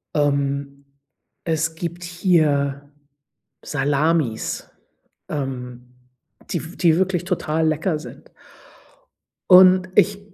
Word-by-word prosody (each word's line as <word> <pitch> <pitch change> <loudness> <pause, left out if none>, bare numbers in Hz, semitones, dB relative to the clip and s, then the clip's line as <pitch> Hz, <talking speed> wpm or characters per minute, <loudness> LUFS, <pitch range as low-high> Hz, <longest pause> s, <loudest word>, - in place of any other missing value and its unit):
Ähm, 140 -1 -1 0.6
es 160 0 -1
gibt 170 +1 -6
hier 150 -6 0 0.7
Salamis, 145 -3 -1 0.6
ähm, 125 -3 -6 0.6
die 170 - -2
w 165 +3 -10
die 165 -3 +3
wirklich 180 -2 0
total 160 -3 -1
lecker 155 +1 -1
sind. 155 - -13 1.2
Und 185 0 +7
ich 200 0 +3
155 Hz, 85 wpm, -21 LUFS, 140-175 Hz, 1.2 s, Und